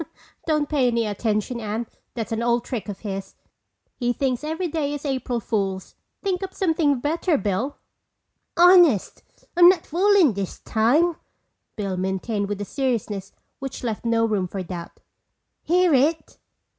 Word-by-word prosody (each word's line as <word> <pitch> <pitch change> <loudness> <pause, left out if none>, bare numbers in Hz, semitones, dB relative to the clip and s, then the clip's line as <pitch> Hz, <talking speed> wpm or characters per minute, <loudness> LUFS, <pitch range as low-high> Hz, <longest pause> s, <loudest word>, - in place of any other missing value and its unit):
"Don't 305 -2 +1
pay 280 -4 +2
any 235 -1 +1
attention, 215 +3 -1
Anne. 220 +1 -3 0.3
That's 230 -1 -4
an 225 0 -1
old 235 0 +1
trick 230 -5 -4
of 200 - -7
his. 195 -2 -5 0.6
He 245 -1 0
thinks 260 0 -1
every 320 +4 -2
day 295 -3 -2
is 290 - -8
April 260 -3 -1
Fool's. 195 -4 -2 0.3
Think 380 -2 -1
up 380 -1 -6
something 320 -7 +1
better, 315 +4 +1
Bill." 210 +8 -2 0.8
"Honest, 350 - +5 0.3
I'm 350 0 +9
not 370 - +2
foolin' 365 - +4
this 195 -1 -4
time," 300 +10 +2 0.6
Bill 195 -3 -3
maintained 190 +2 -2
with 205 -1 -3
a - - -3
seriousness 215 -7 -2 0.3
which 270 -1 -6
left 225 -3 -3
no 230 -1 +2
room 205 -5 0
for 190 +1 -5
doubt. 170 -1 -8 0.6
"Hear 355 0 +3
it?" 300 +4 +1
245 Hz, 150 wpm, -23 LUFS, 210-310 Hz, 0.8 s, I'm